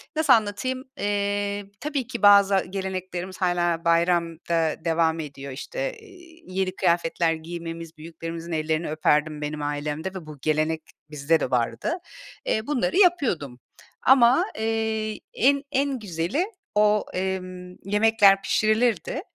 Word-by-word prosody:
nasıl 310 -3 +5
anlatayım? 230 +4 0
Eee, 205 -1 -1
tabii 280 -5 -3
ki 235 -4 -6
bazı 200 -1 +6
geleneklerimiz 185 -1 -5
hâlâ 175 -2 +1
bayramda 170 -1 +1
devam 165 0 +2
ediyor. 140 -2 -7
İşte, - - -4
eee, 350 -5 -17
yeni 185 0 -2
kıyafetler 170 -1 +1
giymemiz, 165 0 -7
büyüklerimizin 165 +1 -7
ellerini 155 0 -1
öperdim, 155 -1 +1
benim 150 0 -4
ailemde 145 +3 -3
ve 185 -4 -7
bu 155 -1 -10
gelenek 155 +1 0 0.3
bizde 150 +2 +1
de - - -3
vardı. 125 - 0 0.5
Eee, 220 +3 -1
bunları 255 - 0
yapıyordum. 240 - +2 0.4
Ama, 255 -1 +5
eee, 220 -1 -1
en, 280 +3 +3
en 275 -2 0
güzeli 190 - -1 0.3
o, 210 0 +3
emm, 185 -1 -4
yemekler 205 -1 +4
pişirilirdi. 215 - +1
185 Hz, 120 wpm, -25 LUFS, 165-220 Hz, 0.5 s, bazı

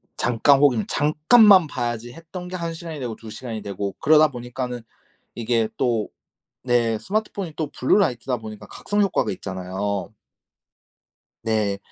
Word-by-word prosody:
'잠깐 130 +4 +3
혹은 130 -6 +3
잠깐만 180 +5 +5
봐야지.' 120 -3 -4
했던 170 +2 -9
게 180 - -6
1 170 -2 -3
시간이 160 -2 -7
되고 120 -4 -4
2 110 - -12
시간이 110 0 -6
되고 100 0 -4
그러다 155 +1 +5
보니까는 125 -1 -5 0.5
이게 115 -1 0
또 115 -4 0 0.6
네 120 -3 +2
스마트폰이 200 - -3
또 155 -3 -3
블루라이트다 125 - +1
보니까 110 -2 -9
각성 205 0 -3
효과가 195 - +1
있잖아요. 95 +1 -4 1.4
네. 105 -3 0
125 Hz, 295 characters per minute, -23 LUFS, 110-155 Hz, 1.4 s, 잠깐만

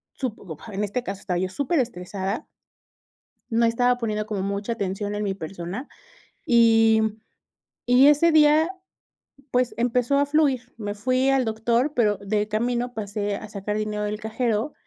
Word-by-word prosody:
supongo, 205 - -5
en 200 +2 -2
este 225 +5 -2
caso 195 -3 -6
estaba 180 -3 -2
yo 185 0 -1
súper 285 - 0
estresada 195 0 -3 1.0
no 230 0 +2
estaba 245 +2 +2
poniendo 215 -3 -2
como 210 -3 -3
mucha 200 +3 -2
atención 205 0 -3
en 210 - -2
mi 195 -1 -1
persona 185 - -6 0.6
y 225 -2 +5 0.9
y 255 +3 +6
ese 295 +3 +5
día, 310 +2 +5 0.8
pues, 250 -1 +1
empezó 245 +3 +1
a 285 - +3
fluir, 280 -5 +1
me 205 -2 -4
fui 255 +5 +1
al 270 -1 +3
doctor, 235 +6 0
pero 210 -5 +2
de 210 +1 -1
camino 240 +3 -1
pasé 205 -1 -3
a 215 - -7
sacar 210 +1 -4
dinero 210 0 -2
del 210 +1 -3
cajero 225 +3 -1
225 Hz, 155 wpm, -24 LUFS, 205-250 Hz, 1.0 s, y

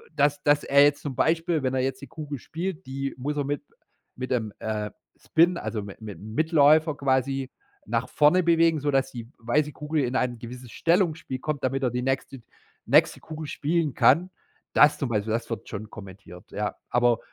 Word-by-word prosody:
dass 145 0 +2
dass 145 0 +3
er 140 +1 +5
jetzt 145 0 +3
zum 145 - -4
Beispiel, 165 +3 +1
wenn 130 -1 -1
er 130 - +1
jetzt 130 0 -2
die 140 - -9
Kugel 150 -4 -7
spielt, 180 +4 -5
die 135 +1 -4
muss 145 +4 -3
er 145 - 0
mit 145 +1 -3 0.5
mit 130 +1 -5
dem, 110 -5 -1
äh, 105 -1 -3 0.3
Spin 170 +2 +3
also, 110 -2 -3
mit 100 -1 -10
mit-'m 110 +1 -8
Mitläufer 155 0 +4
quasi 135 -1 0 0.4
nach 115 +3 -1
vorne 165 +5 +4
bewegen, 165 -2 +3
sodass 135 -2 +1
die 120 -2 -8
weiße 145 +6 0
Kugel 150 0 -1
in 125 +1 -3
ein 120 -2 0
gewisses 125 +1 -9
Stellungsspiel 165 -6 0
kommt, 150 0 -3
damit 135 +1 -1
er 125 - +1
die 125 +1 -2
nächste 135 0 -2 0.4
nächste - - +4
Kugel 155 0 -8
spielen 155 -1 -1
kann. 180 +3 +4 0.4
Das 150 - +6
zum 135 - -1
Beispiel, 110 -1 -1
das 115 0 -2
wird 115 - -5
schon 105 0 -6
kommentiert, 95 -4 -12
ja. 105 0 -3
Aber 120 -1 +3
135 Hz, 185 wpm, -26 LUFS, 120-155 Hz, 0.5 s, Das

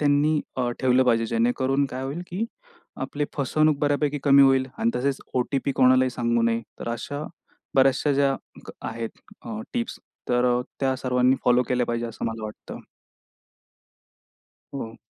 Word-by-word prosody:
त्यांनी 150 +1 +3 0.2
अ, 125 -2 0
ठेवलं 130 0 +4
पाहिजे 115 -2 +2
जेणेकरून 125 +5 +1
काय 130 0 -6
होईल 145 +6 -4
की 190 +5 -2 0.6
आपली 145 0 -2
फसवणूक 155 +2 +2
बऱ्यापैकी 145 0 +1
कमी 140 0 +7
होईल 135 -1 +4
आणि 115 - +2
तसेच 135 +2 -1
ओ-टी-पी 135 +2 0
कोणालाही 130 0 +4
सांगू 120 -1 0
नये. 115 0 +2 0.2
तर - - -4
अशा 145 +5 -4 0.5
बऱ्याचश्या 135 +2 +4
ज्या 140 0 +3 0.5
आहेत 115 0 -4 0.3
अ, 215 -1 -5
टिप्स 235 -1 -2 0.3
तर 125 0 +3
अ, - - 0 0.2
त्या 135 -1 +2
सर्वांनी 125 0 +2
फॉलो 125 0 +4
केल्या 125 -1 +1
पाहिजे 120 0 -2
असं 115 - -6
मला 115 -1 -4
वाटतं. 105 - -8 1.9
हो. 115 -4 -6
130 Hz, 145 wpm, -25 LUFS, 120-140 Hz, 1.9 s, कमी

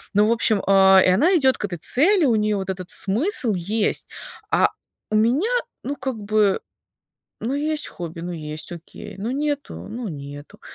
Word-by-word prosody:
Ну, 210 +1 +4
в 230 - +2
общем, 220 -3 +3
а, 190 -1 +6
и - - +4
она 325 - +3
идёт 265 -3 +3
к - - -3
этой 185 -3 -5
цели, 345 - +3
у 235 -5 +3
неё 210 0 +1
вот 190 -1 -5
этот 185 -1 -5
смысл 240 - +2
есть. 205 +5 -1 0.4
А - - +4 0.4
у - - +1
меня, 245 - +2 0.3
ну, 285 - -3
как 265 -2 -4
бы, 210 -1 +1 0.8
ну, 245 +5 -2
есть 300 +1 -1
хобби- 170 -1 -8
ну 175 +1 -5
есть, 155 0 -7
окей, 170 -1 -10
ну 220 +5 -3
нету- 290 +1 -3 0.2
ну 235 0 -5
нету. 145 -2 -10
215 Hz, 180 wpm, -22 LUFS, 185-265 Hz, 0.8 s, а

